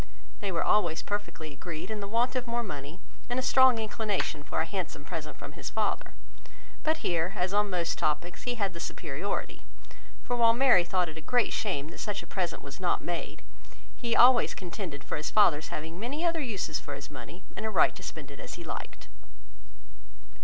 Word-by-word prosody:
They 200 -2 -2
were 170 - +1
always 175 -6 +3
perfectly 165 -7 -4
agreed 165 +5 -6
in 215 - -2
the 200 - -4
want 235 +5 +2
of 255 -1 -1
more 235 0 0
money, 150 -4 -6 0.3
and 245 - 0
a 260 - +1
strong 260 -2 +6
inclination 215 -7 -1
for 145 - -2
a 160 - +2
handsome 165 -5 -4
present 160 -3 -5
from - - -8
his - - -5
father; - - -1 0.7
but 315 +1 0
here, 170 +1 +1
as 185 0 0
on 205 0 +3
most 175 -3 0
topics, 170 +3 0
he 245 -1 -1
had 200 -5 0
the 170 - -7
superiority, 170 +5 -3 0.6
for 245 - -1
while 230 -1 +6
Mary 245 -7 +6
thought 180 0 +1
it 160 0 -8
a - - -9
great 245 +9 +2
shame 160 -8 -1
that - - -10
such 210 -2 -2
a - - -11
present 180 -3 -2
was 140 -1 -8
not 180 -2 +1
made, 175 -1 -4 0.5
he 235 -2 0
always 245 0 +7
contended 175 -5 -5
for - - -3
his 150 - -2
father's 170 -8 +5
having 160 +3 -5
many 280 - -2
other 335 -2 +2
uses 200 - -1
for 145 - -6
his 140 +1 -8
money, 170 +5 -9
and - - -4
a 220 - 0
right - - +5
to - - -10
spend - - -6
it - - -11
as - - -6
he - - -8
liked. - - -6
190 Hz, 205 wpm, -30 LUFS, 160-230 Hz, 0.7 s, always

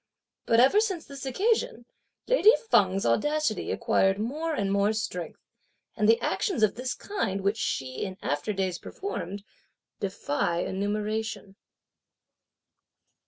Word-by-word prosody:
But 230 - +4
ever 270 - +6
since 380 -7 -2
this 275 -1 -8
occasion, 375 - 0 0.4
lady - - +6 0.2
Feng's 195 -2 +3
audacity 295 - +1
acquired 195 0 +2
more 300 +9 -2
and 200 -5 -1
more 200 +2 +2
strength; 180 -6 -4 0.6
and 215 -1 +2
the 225 - +5
actions 355 - 0
of 210 - +4
this 250 +2 -3
kind, 200 - -3
which 200 +3 0
she, 130 -10 -2
in 185 -2 -5
after 145 +8 -1
days, 190 -3 -2
performed, 205 - -6 0.6
defy 170 -3 -1
enumeration. 210 0 -3
215 Hz, 120 wpm, -27 LUFS, 195-275 Hz, 0.6 s, ever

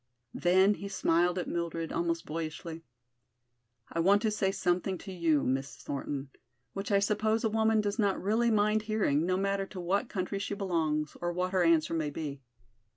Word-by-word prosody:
Then 190 +3 +4
he 200 - -6
smiled 175 -2 +2
at 180 - -2
Mildred 165 -1 -3
almost 170 0 -1
boyishly. 160 +1 -5 1.1
"I 170 - -2
want 200 +5 +4
to 220 - +2
say 200 -2 +1
something 185 0 0
to 190 - -8
you, 165 -5 +2
Miss 135 +2 -1
Thornton, 140 -1 -5 0.4
which 195 +2 -4
I 200 - +5
suppose 215 +3 +1
a 220 - +1
woman 220 0 +3
does 205 +2 -2
not 200 -3 +2
really 225 +5 +2
mind 215 0 +3
hearing, 205 -8 +1
no 185 0 +1
matter 195 0 0
to 190 - -8
what 195 +7 0
country 195 0 -3
she 200 - -3
belongs 160 -6 -1
or 175 0 0
what 180 +1 -1
her 190 -1 +2
answer 165 -1 +3
may 155 -2 0
be. 145 -2 -5
185 Hz, 180 wpm, -30 LUFS, 165-205 Hz, 1.1 s, I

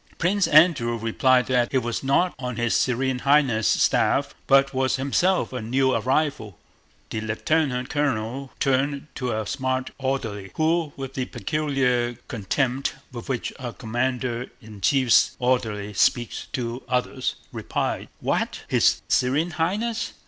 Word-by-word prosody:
Prince 190 +3 +2
Andrew 145 -7 +4
replied 125 +3 +2
that 125 -2 +1
he 135 - +2
was 120 -2 -2
not 155 +7 +2
on 125 -1 -4
his 120 0 0
Serene 130 +1 +1
Highness' 135 -6 +3
staff - - +2
but 135 0 +4
was 130 0 +1
himself 140 +6 +1
a 125 - -3
new 130 +4 +1
arrival. 125 - -1 0.5
The 110 - -2
lieutenant 125 +4 0
colonel 135 -2 -1
turned 140 +1 0
to 125 -2 -3
a 110 -1 -2
smart 130 +2 -2
orderly, 115 -7 -3
who, 160 -1 +1
with 135 -1 -6
the 130 -1 -2
peculiar 130 -6 0
contempt 130 +4 -1 0.2
with 120 +3 -8
which 125 -3 -2
a 120 -2 -5
commander 120 +1 -2
in 110 -3 -13
chief's 130 +3 +4
orderly 110 -5 -1
speaks 120 +3 +1
to 120 0 -3
officers, 125 +1 -1 0.2
replied: - - -3
"What? - - -1
His - - +3
Serene 145 +7 +1
Highness? 215 +9 -1
130 Hz, 135 wpm, -24 LUFS, 120-140 Hz, 0.5 s, Andrew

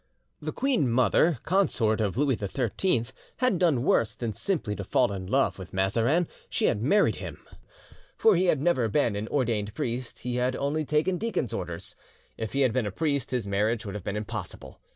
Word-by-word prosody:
"The - - -3
queen 255 - +1
mother, 130 - +3
consort 125 - +2
of 105 0 -1
Louis 140 -2 +2
XIII, 115 - 0 0.3
had 255 -9 +1
done 155 -9 +3
worse 110 -5 +2
than 115 -3 -3
simply 130 - -1
to 100 - -4
fall 100 - +2
in 95 -2 -5
love 135 0 +1
with 90 -2 -9
Mazarin, 115 - +2 0.2
she - - 0
had 105 - +1
married 200 - +3
him, - - -8 0.7
for 220 -3 +5
he 180 +2 +2
had 155 -5 +3
never 140 -6 +2
been 115 -3 +1
an 105 +2 -3
ordained 110 -6 -1
priest, 120 +1 -4
he 125 0 -2
had 125 +1 +1
only 150 +3 -1
taken 155 +5 +1
deacon's 225 - -2
orders. 85 -1 -5 0.4
If 110 -1 -5
he 140 - +1
had 130 -4 +3
been 125 -4 0
a - - -3
priest 140 - -1
his 125 -4 -1
marriage 105 +4 0
would 100 - -5
have 105 -3 -6
been 105 - -3
impossible. 105 -3 -7
120 Hz, 195 wpm, -27 LUFS, 105-150 Hz, 0.7 s, for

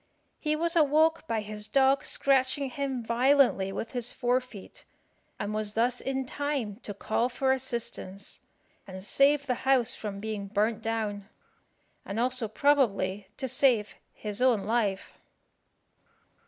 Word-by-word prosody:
He 305 -1 0
was 335 +2 -1
awoke 320 +1 +3
by 225 -4 0
his 210 0 -5
dog 270 0 +3
scratching 270 0 +1
him 270 -2 -3
violently 240 -4 +3
with 225 - -5
his 245 -2 -3
fore 250 0 +1
feet, 230 -6 -12 0.5
and 205 +1 -3
was 215 -1 -3
thus 245 +2 +1
in 265 0 -2
time 270 -7 -3
to 205 -4 -8
call 230 +4 0
for 265 +2 0
assistance, 235 -6 -4 0.5
and 185 -1 -8
save 280 +6 +3
the 255 - +1
house 260 -3 +2
from 205 -2 -6
being 210 -1 -4
burnt 215 +2 0
down, 215 -3 -3 0.7
and 200 +3 -4
also 250 -1 +1
probably 210 -7 +1
to 265 - -3
save 245 -4 +2 0.2
his 210 +1 -5
own 245 -6 +3
life. 210 -3 -1
240 Hz, 140 wpm, -28 LUFS, 210-270 Hz, 0.7 s, awoke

